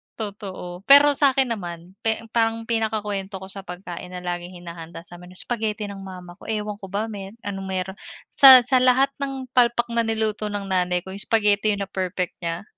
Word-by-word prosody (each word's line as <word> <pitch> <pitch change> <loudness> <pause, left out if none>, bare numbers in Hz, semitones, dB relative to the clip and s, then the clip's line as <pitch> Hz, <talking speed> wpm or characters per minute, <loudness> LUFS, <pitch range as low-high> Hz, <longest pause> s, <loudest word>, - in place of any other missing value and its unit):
Totoo, 195 -4 -7
pero 285 +1 +8
sa'kin 270 -3 +2
naman 175 -4 -6 0.4
parang 225 -1 +1
pinakakwento 210 -3 -2
ko 190 0 -9
sa 195 - -7
pagkain 180 -1 -8
na 180 0 -8
laging 175 0 -5
hinahanda 170 -1 -9
samin, 180 +1 -13
spaghetti 220 -2 -3
ng 200 -1 -7
mama 180 -2 -9
ko. - - -12
Ewan 210 -1 -3
ko 195 - -7
ba 205 +3 -1
meron 200 +1 -8
anong 195 -1 -4
meron 190 +1 -3 0.3
sa 265 -3 +9
sa 255 +1 +3
lahat 260 +2 +4
ng 270 -1 -3
palpak 240 -1 +3
na 235 - +3
niluto 220 -1 -1
ng 205 -1 -4
nanay 180 -2 0
ko 190 - -7
yung 200 - -4
spaghetti 210 -1 +2
na 200 - -2
perfect 185 -2 -3
nya. 170 +2 -3
200 Hz, 180 wpm, -23 LUFS, 180-225 Hz, 0.4 s, sa